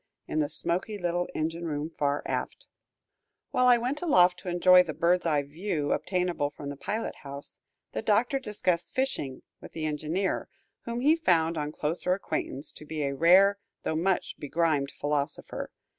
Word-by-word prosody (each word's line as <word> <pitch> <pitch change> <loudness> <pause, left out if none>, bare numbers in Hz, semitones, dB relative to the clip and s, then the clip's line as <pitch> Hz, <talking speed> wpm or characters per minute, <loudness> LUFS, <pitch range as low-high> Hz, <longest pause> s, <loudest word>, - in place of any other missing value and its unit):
in 155 - -1
the 145 -1 +1
smoky 180 +6 -1
little 175 -1 -1
engine 165 +2 -2
room 150 +1 -3
far 145 -2 -1
aft. - - -3 0.9
While 250 - +3
I 245 -1 +7
went 255 +5 -2
aloft 180 - +4
to 180 - -6
enjoy 180 +1 +7
the 160 -5 -4
bird's 175 +1 +2
eye 150 -3 +2
view 150 0 -3
obtainable 180 -6 0
from 145 0 -8
the 145 - -5
pilot 215 +10 -3
house, 140 0 -10 0.3
the - - -3
Doctor 240 +6 +2
discussed 185 -7 -1
fishing 150 - -2 0.2
with - - -11
the 160 -1 -3
engineer, 155 +5 -1 0.4
whom 235 +1 -3
he 300 +4 +5
found 170 - +2
on 150 -1 -2
closer 165 +4 -1
acquaintance 145 -6 -3
to - - -11
be 155 0 -4
a 140 0 -1
rare, 190 +7 +5 0.2
though 160 - -1
much 180 +3 0
begrimed 150 -2 0
philosopher. 145 0 -3
170 Hz, 165 wpm, -28 LUFS, 150-190 Hz, 0.9 s, I